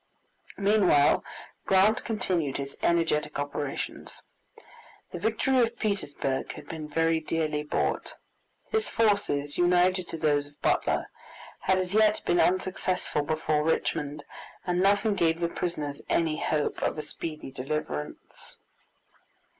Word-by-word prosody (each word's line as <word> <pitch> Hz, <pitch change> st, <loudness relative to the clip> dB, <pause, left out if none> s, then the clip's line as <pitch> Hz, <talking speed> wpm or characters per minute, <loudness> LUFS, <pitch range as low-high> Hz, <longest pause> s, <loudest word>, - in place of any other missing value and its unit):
Meanwhile 200 Hz, -8 st, +4 dB, 0.4 s
Grant 200 Hz, +5 st, +4 dB
continued 180 Hz, -, -1 dB
his 140 Hz, 0 st, -5 dB
energetic 165 Hz, -3 st, +1 dB
operations. 145 Hz, 0 st, -4 dB, 0.9 s
The 175 Hz, -, -5 dB
victory 230 Hz, +6 st, +1 dB
of 235 Hz, -1 st, +1 dB
Petersburg 145 Hz, -10 st, -2 dB
had -, -, -11 dB
been 155 Hz, -2 st, -6 dB
very 165 Hz, +1 st, +2 dB
dearly 155 Hz, -1 st, -1 dB
bought. 150 Hz, -, -2 dB, 0.6 s
His 440 Hz, 0 st, +1 dB
forces, 200 Hz, -11 st, +1 dB
united 180 Hz, +1 st, +3 dB
to -, -, -5 dB
those 145 Hz, -2 st, +1 dB
of 145 Hz, -, -22 dB
Butler, -, -, +1 dB, 0.5 s
had 190 Hz, -, +2 dB
as 185 Hz, 0 st, -1 dB
yet 215 Hz, 0 st, +4 dB
been 175 Hz, -, +2 dB
unsuccessful 185 Hz, -3 st, +1 dB
before 155 Hz, 0 st, 0 dB
Richmond, 150 Hz, -2 st, -1 dB, 0.4 s
and 180 Hz, -1 st, +1 dB
nothing 205 Hz, +2 st, +3 dB
gave 165 Hz, -3 st, +1 dB
the 170 Hz, -, +1 dB
prisoners 155 Hz, -5 st, -4 dB
any 160 Hz, -2 st, +1 dB
hope 150 Hz, -2 st, -1 dB
of -, -, 0 dB
a 155 Hz, -, -3 dB
speedy 155 Hz, -2 st, -6 dB
deliverance. 130 Hz, -, -5 dB
165 Hz, 120 wpm, -28 LUFS, 150-190 Hz, 0.9 s, Meanwhile